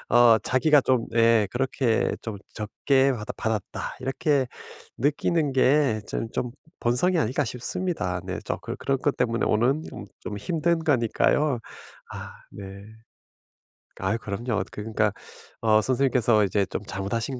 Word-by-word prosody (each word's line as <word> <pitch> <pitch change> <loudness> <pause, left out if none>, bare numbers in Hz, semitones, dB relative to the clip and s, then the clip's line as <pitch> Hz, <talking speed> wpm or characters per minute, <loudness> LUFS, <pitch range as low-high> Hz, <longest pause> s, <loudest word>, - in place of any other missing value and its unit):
어 120 -2 +7
자기가 145 +3 +3
좀 130 -3 +1
예 115 -2 +4
그렇게 130 -2 +1
좀 110 -3 -5 0.2
'적게 135 +6 +1
받았 105 -3 -5
받았다.' 110 -3 -3
이렇게 135 +1 +1 0.5
느끼는 145 +2 +1
게 130 -4 +3
전 115 - -3
좀 125 -1 -2 0.3
본성이 125 +10 +2
아닐까 145 0 +1
싶습니다. 120 - -2
네 95 0 -4
좀 - - -2
그런 - - -6
그런 135 -1 0
것 145 +1 0
때문에 115 -1 0
오는 125 +8 +2
좀 100 - -8
좀 105 - -6
힘든 165 - 0
거니까요. 140 +1 +2 0.5
아 - - -8 0.2
네. 100 0 -9 1.2
아유 95 +4 0
그럼요. 105 +1 -2
그러니까 105 0 -1 0.5
어 110 -1 +4
선생님께서 125 -3 +3
이제 100 +1 +1
좀 100 - -4
잘못하신 110 +7 -3
120 Hz, 275 characters per minute, -25 LUFS, 105-135 Hz, 1.2 s, 어